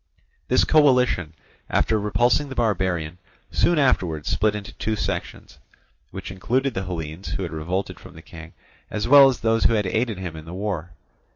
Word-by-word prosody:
This - - +3
coalition, 125 - +3 0.3
after 110 - +1
repulsing 120 +8 +1
the 135 - -7
barbarian, 90 -7 -1 0.3
soon 175 - +2
afterwards 90 - +1
split 105 0 +1
into 105 -1 -7
two 110 0 -2
sections, - - -5 0.5
which 95 - -7
included 130 +8 -1
the 95 -2 -3
Hellenes 80 0 -5
who 95 - -3
had 85 - -5
revolted 90 +3 -3
from - - -14
the 80 - -13
King, 80 -1 -12 0.4
as 105 +1 -3
well 140 +1 +8
as 130 - -4
those 115 0 +1
who - - +4
had 105 -2 +1
aided 110 +2 -1
him 90 -4 -6
in 80 0 -9
the 85 +2 -8
war. 95 -4 -3
100 Hz, 175 wpm, -23 LUFS, 85-115 Hz, 0.5 s, well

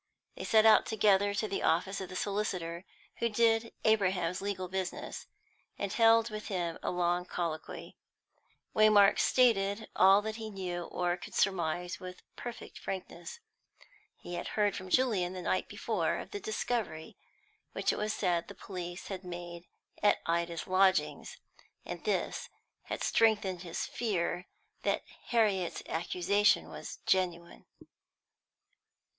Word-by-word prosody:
They - - -6
set 220 0 +5
out 220 - +7
together 205 -2 +3
to 215 +2 0
the 200 - -2
office 190 +4 +1
of 190 - -6
the 185 - -8
solicitor 185 -4 -2 0.3
who 235 - +1
did 225 +1 +2
Abraham's 185 -5 +2
legal 195 -2 -3
business, 190 0 -4 0.5
and 200 -1 -3
held 230 0 +5
with 215 0 -6
him 175 -4 -2
a - - -2
long 175 0 +1
colloquy. 165 -3 -5 0.8
Waymark 210 -2 +6
stated 215 -4 +3
all 195 +2 +6
he 220 0 -4
knew 180 -4 -4
or 175 +1 -1
could 190 - -10
surmise 175 -2 0
with 180 0 -9
perfect 240 -1 -8
frankness. 195 - -6 0.8
He 175 - -9
had 175 - -4
heard 205 -2 +2
from 185 0 -7
Julian 200 -7 +2
the 185 - -5
night - - 0
before - - -1
of - - -8
the 410 - -4
discovery 240 - -3 0.6
which - - +1
it - - -4
was 215 0 0
said 175 -5 0
the 200 - -10
police 180 -2 -7
had 190 -1 -5
made 175 -1 -8 0.3
at 205 - +5
Ida's 170 0 -1
lodgings, 190 0 +2 0.5
and - - -6
this - - -1 0.4
had - - -4
strengthened 205 -5 +2
his 175 -2 -4
fear 180 -5 -2 0.3
that - - 0 0.2
Harriet's 205 -7 +1
accusation 180 +5 +2
was - - -8
genuine. 175 -2 0
190 Hz, 135 wpm, -31 LUFS, 175-215 Hz, 0.8 s, out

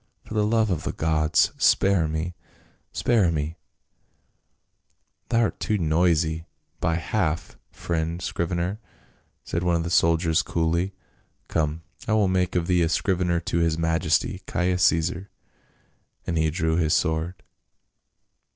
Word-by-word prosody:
For - - -9
the 105 -1 +2
love 110 -2 +2
of 80 -4 -1
the - - -3
gods, 80 -1 +2
spare 95 -5 +3
me! 80 +3 -3 0.6
spare 105 -8 +2
me 80 +1 -3 0.8
!" - - -48
"Thou'rt 115 -2 +1
too 105 - 0
noisy 80 -1 +1 0.3
by 80 - +1
half, 85 -1 -2
friend 85 0 -3
scrivener," 85 +3 -2 0.6
said 85 - -3
one 90 -1 +1
of 85 - 0
the 85 - -4
soldiers 80 -1 +3
coolly. 85 +3 -1 0.3
" - - -42
Come, 80 0 -1 0.2
I 110 - +1
will 105 -2 +3
make 90 -1 0
of 85 -2 +1
thee 90 -1 +2
a 80 - +2
scrivener 90 -1 +1
to 85 0 -1
his 80 -1 +1
majesty, 80 0 0
Caius 90 +1 0
Caesar," 85 +4 +1 1.0
and 85 - -2
he 80 -1 +2
drew 80 0 0
his 80 -3 +2
sword. 80 +2 -1
85 Hz, 140 wpm, -25 LUFS, 80-90 Hz, 1.0 s, spare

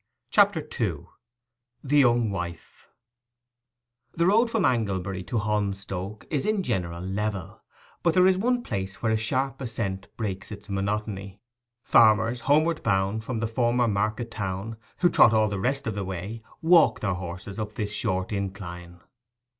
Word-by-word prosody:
CHAPTER - - +4
II—THE 120 +3 -5
YOUNG 120 -4 +3
WIFE 85 -3 -7 1.2
The 170 - +1
road 225 +6 +4
from 225 -5 +1
Anglebury 100 -5 0
to 120 - -1
Holmstoke 100 -1 -2
is 145 -4 0
in 215 -2 0
general 90 - -2
level; 100 -1 -3 0.4
but 170 -2 +2
there 180 0 +6
is 190 0 +5
one 245 +5 0
place 95 - -5
where 115 - +2
a - - +3
sharp 130 +4 -1
ascent 100 -6 -3
breaks 100 -3 -4
its 105 0 -9
monotony. 100 0 -3 0.4
Farmers 115 +1 +4
homeward 155 +2 +3
bound 100 +1 0
from 115 -1 -3
the 115 - 0
former 120 +1 +1
market 110 +3 -1
town, 100 +2 -4 0.2
who 175 - +5
trot 115 - +6
all 110 -1 +3
the 100 -1 -3
rest 135 +6 0
of 115 - -1
the 100 0 -3
way, 95 +4 -5 0.2
walk 165 -8 +5
their 100 -3 0
horses 95 +3 -6
up 105 0 -4
this 105 -1 -3
short 95 -5 -1
incline. 90 -3 -5
110 Hz, 150 wpm, -26 LUFS, 95-120 Hz, 1.2 s, there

